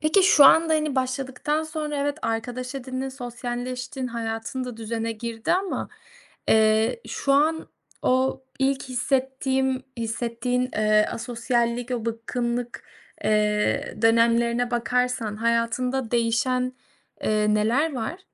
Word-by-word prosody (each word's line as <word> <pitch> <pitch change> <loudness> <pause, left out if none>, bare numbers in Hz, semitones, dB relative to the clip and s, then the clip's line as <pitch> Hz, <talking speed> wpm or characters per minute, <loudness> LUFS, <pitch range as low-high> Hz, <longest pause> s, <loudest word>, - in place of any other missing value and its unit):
peki, 310 +6 +4
şu 310 -6 +7
anda, 320 +3 +6
hani, 305 -2 0
başladıktan 265 +3 -1
sonra 305 -1 -4
evet, 285 +2 -1
arkadaş 245 +3 -3
edindin, 260 0 -4
sosyalleştin, 250 0 -5
hayatın 230 +2 -4
da 250 -2 -7
düzene 225 0 -3
girdi 225 0 -3
ama, 380 +2 -1 0.6
eee, 220 - +3
şu 275 - 0
an 315 +3 +2 0.3
o 260 +1 +1 0.2
ilk 270 0 +1
hissettiğim 265 0 0 0.2
hissettiğin, 235 +2 -1
eee, 215 0 +3
asosyallik 235 0 -1
o 240 -3 -2
bıkkınlık, 235 +1 -3 0.4
eee, 210 -1 +1
dönemlerine 235 +1 +3
bakarsan 245 -3 0
hayatında 235 +2 0
değişen, 250 +2 +1 0.5
eee, 210 0 +2
neler 240 +9 +2
var? 255 +9 -3
245 Hz, 110 wpm, -25 LUFS, 230-265 Hz, 0.6 s, şu